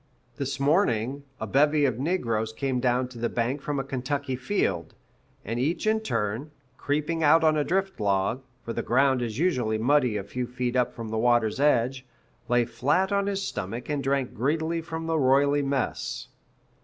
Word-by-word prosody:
This 140 Hz, -2 st, -3 dB
morning, 140 Hz, -, +1 dB
a 110 Hz, -, -3 dB
bevy 145 Hz, +5 st, +3 dB
of 125 Hz, -3 st, 0 dB
negroes 115 Hz, -9 st, 0 dB
came 130 Hz, +1 st, -1 dB
down 125 Hz, 0 st, +1 dB
the 120 Hz, 0 st, -2 dB
bank 125 Hz, +4 st, -1 dB
from 145 Hz, -1 st, -2 dB
a -, -, -1 dB
Kentucky 135 Hz, +1 st, -3 dB
field; 130 Hz, +11 st, -1 dB, 0.5 s
and 115 Hz, +3 st, -2 dB
each 160 Hz, -, 0 dB
in 220 Hz, 0 st, +3 dB
turn, 120 Hz, -, -2 dB, 0.3 s
creeping 150 Hz, +4 st, -1 dB
out 160 Hz, +2 st, +5 dB
on 155 Hz, -1 st, +4 dB
a 150 Hz, -, +2 dB
drift 190 Hz, +2 st, -1 dB
log, 100 Hz, +4 st, +1 dB, 0.2 s
for 115 Hz, -, -3 dB
the -, -, -2 dB
ground 130 Hz, +1 st, +2 dB
is 115 Hz, -2 st, -3 dB
usually 125 Hz, -10 st, +1 dB
muddy 125 Hz, -1 st, +2 dB
a 100 Hz, -, -3 dB
few 125 Hz, +4 st, -4 dB
feet 125 Hz, 0 st, -3 dB
up 125 Hz, -1 st, +2 dB
from 115 Hz, -2 st, -6 dB
the 110 Hz, 0 st, -1 dB
water's 120 Hz, -1 st, +2 dB
edge, 130 Hz, -2 st, +2 dB, 0.5 s
lay 120 Hz, -1 st, +3 dB
flat 145 Hz, -, +1 dB
on 200 Hz, 0 st, +1 dB
his 195 Hz, -1 st, -1 dB
stomach 110 Hz, -, -5 dB
and 145 Hz, -2 st, -1 dB
drank 135 Hz, -1 st, 0 dB
greedily 160 Hz, +7 st, 0 dB
from 160 Hz, 0 st, -5 dB
the 165 Hz, -1 st, 0 dB
roily 140 Hz, +2 st, +4 dB
mess. 140 Hz, -1 st, -2 dB
135 Hz, 180 wpm, -26 LUFS, 120-150 Hz, 0.5 s, out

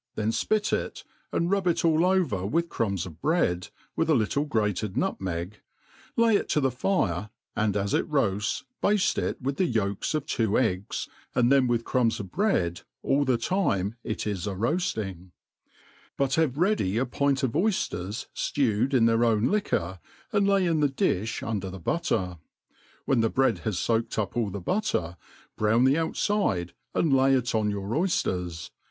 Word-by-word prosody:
then 110 Hz, +1 st, 0 dB
fpit 210 Hz, -, 0 dB
it, -, -, -2 dB, 0.3 s
and 170 Hz, +2 st, 0 dB
rub 200 Hz, -2 st, +1 dB
it 170 Hz, 0 st, +1 dB
all 160 Hz, 0 st, +4 dB
over 175 Hz, -, +1 dB
with 165 Hz, -, 0 dB
crumbs 100 Hz, -5 st, -1 dB
of 85 Hz, -3 st, -11 dB
bread, 90 Hz, -, +1 dB, 0.3 s
with 160 Hz, -, 0 dB
a 155 Hz, -, +5 dB
little 130 Hz, +5 st, +1 dB
grated 105 Hz, -, -1 dB
nutmeg, 90 Hz, +2 st, -2 dB, 0.6 s
lay 230 Hz, -2 st, +5 dB
it -, -, 0 dB
to -, -, +2 dB
the 135 Hz, -2 st, +1 dB
^iire, 110 Hz, -, 0 dB, 0.3 s
and 105 Hz, -2 st, +1 dB
as 100 Hz, 0 st, -1 dB
it -, -, +1 dB
roafls, 105 Hz, -8 st, 0 dB, 0.2 s
bade 205 Hz, -2 st, +2 dB
it -, -, -2 dB
with 135 Hz, +1 st, -3 dB
the 185 Hz, -8 st, +1 dB
yolka 100 Hz, +4 st, -1 dB
of 150 Hz, -, -5 dB
two 110 Hz, -8 st, +1 dB
eggs, 100 Hz, -6 st, -1 dB, 0.3 s
and 125 Hz, 0 st, +3 dB
thert 135 Hz, -2 st, +5 dB
with 120 Hz, -1 st, +1 dB
crumbs 120 Hz, -3 st, +1 dB
of 95 Hz, -4 st, -7 dB
bread 90 Hz, -, 0 dB, 0.2 s
all 140 Hz, +1 st, +2 dB
the 130 Hz, -2 st, +2 dB
time 115 Hz, -, 0 dB
it 110 Hz, -, -3 dB
is 100 Hz, -4 st, -2 dB
a 100 Hz, -, -3 dB
roafting 105 Hz, -, -2 dB, 0.4 s
\ -, -, -29 dB
but 135 Hz, -1 st, +1 dB
have 150 Hz, -4 st, +1 dB
ready 175 Hz, -, +1 dB
a 125 Hz, -, +2 dB
pint 140 Hz, +2 st, 0 dB
of 130 Hz, -, +1 dB
oyfiers 115 Hz, -, -1 dB
ftewed 130 Hz, 0 st, +1 dB
in 115 Hz, -3 st, +5 dB
their 115 Hz, +1 st, +3 dB
own 115 Hz, -1 st, +3 dB
liquor, 95 Hz, -, -1 dB, 0.3 s
and 200 Hz, -1 st, +2 dB
lay 195 Hz, -2 st, +3 dB
in 165 Hz, -2 st, +1 dB
the 145 Hz, -1 st, +3 dB
di(h 115 Hz, -5 st, -1 dB
under 100 Hz, -4 st, -2 dB
the 95 Hz, -, -7 dB
butter; 90 Hz, -, -1 dB, 0.7 s
when 130 Hz, -, +2 dB
the 115 Hz, -, +2 dB
bread 130 Hz, -5 st, +2 dB
ha^foaked 110 Hz, +3 st, 0 dB
up 105 Hz, -4 st, -2 dB
all 115 Hz, -4 st, 0 dB
the 100 Hz, +1 st, -5 dB
butter^ 90 Hz, -, -1 dB, 0.4 s
brown 110 Hz, +3 st, +3 dB
the 130 Hz, +1 st, +5 dB
outfide, 160 Hz, -, 0 dB, 0.2 s
and 155 Hz, -5 st, +2 dB
lay 135 Hz, 0 st, +4 dB
it 125 Hz, -2 st, 0 dB
00 110 Hz, -2 st, +1 dB
your 100 Hz, -1 st, -2 dB
oyfters. 95 Hz, -, -1 dB
115 Hz, 175 wpm, -27 LUFS, 100-155 Hz, 0.7 s, a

